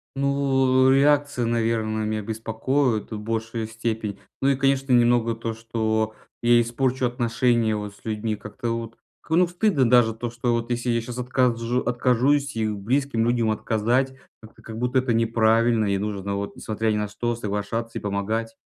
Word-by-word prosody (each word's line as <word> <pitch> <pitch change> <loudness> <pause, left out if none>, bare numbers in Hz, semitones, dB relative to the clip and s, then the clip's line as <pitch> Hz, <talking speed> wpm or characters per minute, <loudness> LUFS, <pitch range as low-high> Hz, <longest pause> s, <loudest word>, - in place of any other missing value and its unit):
Ну, 135 -1 +2
э, - - +5
реакция, 145 -2 +2
наверное, 115 -2 0
меня 110 0 -2
беспокоит 115 +3 -1
в 110 - -4
большей 110 +1 -3
степени. 110 -2 -4 0.2
Ну 135 - +3
и, 135 - +3
конечно, 135 0 +1
немного 120 -1 +3
то, 115 0 -4
что 110 -1 -1 0.3
я 120 0 +5
испорчу 125 +2 0
отношения 120 -2 +1
вот 105 -1 -6
с - - -23
людьми. 110 0 -2
Как-то 110 +3 -5
вот 115 0 -5 0.2
к - - -24
ну 175 +3 +4
стыдно 175 - +1
даже, 120 -2 +5
то 120 +2 -4
что 120 +1 -2
вот 115 0 -2
если 120 +1 -1
я 115 -1 +2
щас 120 +1 -7
отказжу 125 -1 0
откажусь 130 +3 +1
и 110 -1 0
у 105 -1 -3
близким 125 +3 0
людям 120 -2 +1
отказать, 120 +5 0 0.3
как-то 110 -1 -16
как 110 -1 -8
будто 125 +2 +1
это 125 -2 0
неправильно. 115 0 +3
И 100 -1 +1
нужно 100 -1 -3
вот, 100 0 -5
несмотря 110 0 -1
ни 105 - 0
на 105 0 -1
что, 120 +3 -2
соглашаться 115 +1 -3
и - - -5
помогать. 110 +3 -2
115 Hz, 175 wpm, -24 LUFS, 110-125 Hz, 0.3 s, э